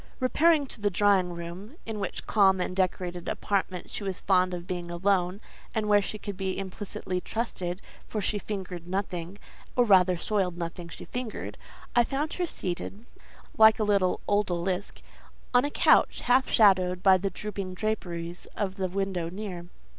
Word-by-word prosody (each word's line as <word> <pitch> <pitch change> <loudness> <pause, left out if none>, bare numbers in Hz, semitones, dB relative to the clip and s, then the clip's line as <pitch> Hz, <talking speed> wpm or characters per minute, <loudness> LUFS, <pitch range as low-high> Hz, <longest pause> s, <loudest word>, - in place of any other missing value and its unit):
Repairing 300 +3 +4
to 240 - -5
the 205 - +2
drawing 195 -2 +3
room—in 195 - -7
which 195 - -4
calm 195 -3 +4
and 180 0 -2
decorated 180 -2 -1
apartment 190 -3 -2
she - - -4
was 190 -2 -3
fond 185 -1 +3
of 175 -1 -5
being 175 -1 -4
alone, 180 +1 +1 0.4
and 215 -1 0
where 205 -1 +5
she 215 - -4
could 205 -1 -6
be 190 0 -2
implicitly 190 -1 -4
trusted, 190 -5 -3 0.2
for 215 - -3
she 205 +1 -1
fingered 185 -5 -6
nothing, 185 -1 -3 0.4
or 245 - +4
rather 185 -4 +5
soiled 185 -1 -1
nothing 170 0 -5
she - - -9
fingered—I 240 0 -3
found 285 +5 -2
her 355 -1 -1
seated, 195 - -5 0.5
like 220 0 +8
a 220 - 0
little 200 -3 +2
Odalisque, 190 -2 -1 0.5
on 245 +2 +5
a - - 0
couch, - - +4
half 255 +2 +3
shaded 185 -4 +4
by 190 -1 +7
the 195 +2 -1
drooping 195 -1 -5
draperies 175 -5 -3
of 195 -2 -2
the 190 -1 0
window 185 -2 -2
near. 180 -2 -6
190 Hz, 160 wpm, -28 LUFS, 180-210 Hz, 0.5 s, like